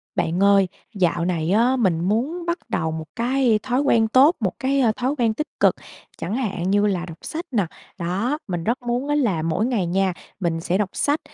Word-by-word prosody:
Bạn 175 Hz, +4 st, 0 dB
ơi, 200 Hz, -1 st, +5 dB, 0.3 s
dạo 175 Hz, -3 st, +1 dB
này 170 Hz, -2 st, -1 dB
á, 235 Hz, +6 st, +3 dB
mình 190 Hz, -10 st, +1 dB
muốn 245 Hz, -, -1 dB
bắt 340 Hz, +1 st, 0 dB
đầu 160 Hz, 0 st, -1 dB
một 160 Hz, 0 st, -5 dB
cái 240 Hz, -2 st, +2 dB
thói 260 Hz, +1 st, +1 dB
quen 230 Hz, -5 st, +3 dB
tốt, 270 Hz, +9 st, +5 dB
một 190 Hz, -5 st, 0 dB
cái, 275 Hz, +1 st, +1 dB
a, 240 Hz, -4 st, +4 dB
thói 255 Hz, +6 st, -2 dB
quen 230 Hz, -3 st, +2 dB
tích 305 Hz, +8 st, -3 dB
cực -, -, +4 dB, 0.4 s
chẳng 200 Hz, -, -3 dB
hạn 200 Hz, -8 st, -2 dB
như 205 Hz, +1 st, +3 dB
là 185 Hz, -4 st, 0 dB
đọc 165 Hz, -2 st, -10 dB
sách 330 Hz, +3 st, -5 dB
nè, 205 Hz, -6 st, +1 dB, 0.3 s
đó, 195 Hz, -, -1 dB
mình 175 Hz, -3 st, -3 dB
rất 235 Hz, +6 st, -1 dB
muốn 245 Hz, +3 st, -2 dB
á 290 Hz, -, +1 dB
là 220 Hz, -, +1 dB
mỗi 165 Hz, +7 st, 0 dB
ngày 235 Hz, -7 st, 0 dB
nha, 190 Hz, +1 st, +1 dB, 0.3 s
mình 170 Hz, -3 st, -1 dB
sẽ 175 Hz, +3 st, 0 dB
đọc 205 Hz, -2 st, 0 dB
sách 290 Hz, +2 st, +1 dB
215 Hz, 215 wpm, -22 LUFS, 180-255 Hz, 0.4 s, ơi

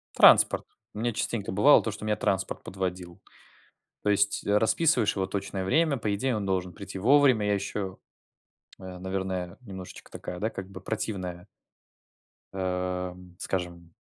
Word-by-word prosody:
Транспорт. -, -, +6 dB, 0.3 s
У 105 Hz, -, -7 dB
меня 120 Hz, +1 st, 0 dB
частенько 105 Hz, -1 st, -2 dB
бывало 105 Hz, +10 st, +6 dB
то, 110 Hz, -, -2 dB
что 105 Hz, +1 st, -7 dB
меня 105 Hz, -, +1 dB
транспорт 95 Hz, -2 st, -1 dB
подводил. 90 Hz, -2 st, -5 dB, 0.8 s
То -, -, -1 dB
есть 100 Hz, 0 st, +2 dB
расписываешь 110 Hz, +3 st, +3 dB
его 95 Hz, -2 st, -1 dB
точное 95 Hz, 0 st, -3 dB
время, 150 Hz, -, +2 dB
по 105 Hz, -2 st, -1 dB
идее, 125 Hz, +5 st, 0 dB
он 100 Hz, -, -3 dB
должен 90 Hz, -2 st, -1 dB
прийти 100 Hz, -1 st, -8 dB
вовремя. 130 Hz, -1 st, +5 dB
Я 105 Hz, -, +2 dB
еще 100 Hz, -1 st, -3 dB, 0.8 s
э, 95 Hz, -1 st, -8 dB
наверное, 95 Hz, -1 st, -3 dB
немножечко 95 Hz, -5 st, -10 dB
такая, 90 Hz, -, -7 dB
да, 110 Hz, +3 st, 0 dB
как 95 Hz, -3 st, -7 dB
бы 95 Hz, -1 st, -9 dB
противная 95 Hz, -5 st, -4 dB, 1.1 s
эм, 90 Hz, -1 st, -3 dB
скажем, 85 Hz, -3 st, -4 dB
95 Hz, 145 wpm, -28 LUFS, 90-105 Hz, 1.1 s, Транспорт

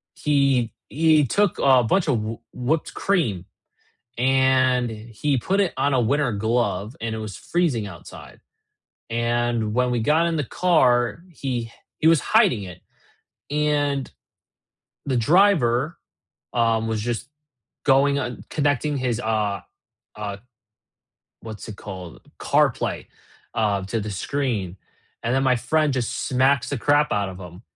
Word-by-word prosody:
he 140 Hz, -5 st, +1 dB, 0.2 s
he 155 Hz, 0 st, +3 dB
took 200 Hz, -, +1 dB
a 130 Hz, -2 st, +5 dB
bunch 165 Hz, -, +1 dB
of 125 Hz, -6 st, +2 dB
wh 110 Hz, +1 st, -4 dB
whipped 140 Hz, +6 st, -2 dB
cream, 120 Hz, -, 0 dB, 0.7 s
and 130 Hz, -1 st, +3 dB
he 115 Hz, +6 st, -2 dB
put 190 Hz, +10 st, 0 dB
it 195 Hz, -4 st, +1 dB
on 140 Hz, +2 st, +1 dB
a 130 Hz, -, +3 dB
winter 135 Hz, +3 st, +1 dB
glove 110 Hz, 0 st, -1 dB
and 115 Hz, -1 st, -2 dB
it -, -, -4 dB
was 110 Hz, -3 st, -6 dB
freezing 160 Hz, -11 st, -1 dB
outside, 85 Hz, -5 st, -12 dB, 0.7 s
and 115 Hz, -1 st, 0 dB
when 125 Hz, +1 st, +1 dB
we 120 Hz, -2 st, 0 dB
got 155 Hz, +7 st, +3 dB
in 170 Hz, -, -1 dB
the 150 Hz, -, 0 dB
car, 125 Hz, -, +2 dB
he 125 Hz, -7 st, -4 dB, 0.3 s
he 155 Hz, -, +3 dB
was 165 Hz, -2 st, +6 dB
hiding 200 Hz, -, +3 dB
it, 90 Hz, -3 st, -10 dB, 0.7 s
and 145 Hz, -2 st, 0 dB, 0.9 s
the 130 Hz, -3 st, 0 dB
driver, 150 Hz, -, +3 dB, 0.6 s
um, 115 Hz, -1 st, +1 dB
was 110 Hz, -1 st, -1 dB
just 120 Hz, +2 st, -3 dB, 0.6 s
going 140 Hz, +1 st, +4 dB
uh, 125 Hz, -3 st, -3 dB
connecting 145 Hz, 0 st, 0 dB
his, 125 Hz, -3 st, -1 dB
uh 105 Hz, -4 st, -1 dB, 0.5 s
uh, 105 Hz, -1 st, -5 dB, 1.0 s
what's 110 Hz, 0 st, -8 dB
it 105 Hz, -, -8 dB
called, 95 Hz, -4 st, -9 dB, 0.2 s
CarPlay, -, -, +1 dB, 0.5 s
uh, 100 Hz, -3 st, 0 dB
to 110 Hz, +3 st, -2 dB
the 105 Hz, +1 st, -5 dB
screen, 105 Hz, -4 st, -2 dB, 0.5 s
and 115 Hz, +1 st, 0 dB
then 135 Hz, +1 st, +2 dB
my 130 Hz, -1 st, +3 dB
friend 155 Hz, +4 st, +1 dB
just 125 Hz, -3 st, -2 dB
smacks 130 Hz, +1 st, +2 dB
the 145 Hz, -, -2 dB
crap 145 Hz, +4 st, +2 dB
out 100 Hz, -1 st, 0 dB
of 95 Hz, -, -9 dB
him, 90 Hz, 0 st, -11 dB
125 Hz, 140 wpm, -23 LUFS, 110-145 Hz, 1.0 s, was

